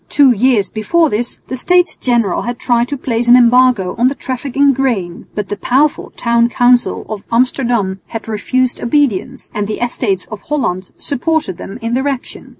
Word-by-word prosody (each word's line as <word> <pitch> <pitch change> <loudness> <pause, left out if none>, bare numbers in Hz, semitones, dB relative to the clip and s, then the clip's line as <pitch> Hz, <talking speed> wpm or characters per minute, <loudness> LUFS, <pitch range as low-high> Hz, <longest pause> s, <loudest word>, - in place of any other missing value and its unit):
Two 280 -3 +5
years 235 -3 +2
before 320 +9 +1
this 235 +3 -2
the 260 - -4
States 355 +6 +2
General 235 -7 0
had 240 0 -4
tried 240 -1 +1
to 285 - -4
place 240 -2 -1
an 240 - +8
embargo 245 -6 +3
on 245 - +4
the 275 - -1
traffic 260 0 -5
in 280 0 +5
grain, 230 -10 -2
but 210 -2 -3
the 205 - -2
powerful 275 +7 0
town 235 0 +2
council 245 0 +2
of 215 -2 -5
Amsterdam 235 -5 0
had 225 -1 -7
refused 245 +4 -1
obedience 240 -6 -1
and 205 -1 -2
the 215 - -4
Estates 225 -6 -1
of 210 -2 -7
Holland 185 -11 -2
supported 285 - -2
them 195 - -8
in 230 +1 -2
their 265 +3 0
action. 270 -3 -5
240 Hz, 180 wpm, -15 LUFS, 215-265 Hz, -, an